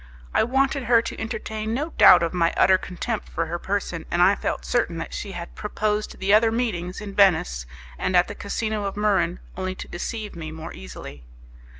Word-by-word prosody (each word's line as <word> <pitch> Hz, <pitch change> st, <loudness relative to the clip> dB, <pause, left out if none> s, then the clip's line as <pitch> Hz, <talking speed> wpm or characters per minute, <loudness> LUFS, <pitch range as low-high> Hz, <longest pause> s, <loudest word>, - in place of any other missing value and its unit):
I -, -, +4 dB
wanted 270 Hz, +2 st, +1 dB
her 235 Hz, -1 st, +5 dB
to 230 Hz, -, -5 dB
entertain 220 Hz, 0 st, -3 dB
no 300 Hz, +5 st, -2 dB
doubt 180 Hz, -, +7 dB
of 170 Hz, -, -1 dB
my 170 Hz, -2 st, +1 dB
utter 190 Hz, -1 st, +5 dB
contempt 210 Hz, +5 st, -4 dB
for 165 Hz, -, -2 dB
her 170 Hz, +2 st, -4 dB
person, 190 Hz, -4 st, -3 dB
and 175 Hz, -, -1 dB
I 185 Hz, +3 st, +6 dB
felt -, -, -3 dB
certain 205 Hz, -9 st, 0 dB
that 165 Hz, -, -6 dB
she 200 Hz, -, -5 dB
had 170 Hz, -1 st, -7 dB
proposed 210 Hz, 0 st, -2 dB
the 195 Hz, +1 st, +1 dB
other 225 Hz, +1 st, +5 dB
meetings 200 Hz, -6 st, -2 dB
in 205 Hz, -1 st, -7 dB
Venice 110 Hz, -, +3 dB, 0.3 s
and 185 Hz, -, 0 dB
at 175 Hz, -, +4 dB
the -, -, -6 dB
casino 210 Hz, +1 st, -3 dB
of 195 Hz, -, -3 dB
Muran 200 Hz, -4 st, +2 dB, 0.2 s
only 185 Hz, 0 st, -3 dB
to -, -, -8 dB
deceive 210 Hz, +4 st, -5 dB
me 160 Hz, -2 st, -6 dB
more 160 Hz, 0 st, -8 dB
easily. 65 Hz, +2 st, -10 dB
195 Hz, 200 wpm, -24 LUFS, 175-220 Hz, 0.3 s, doubt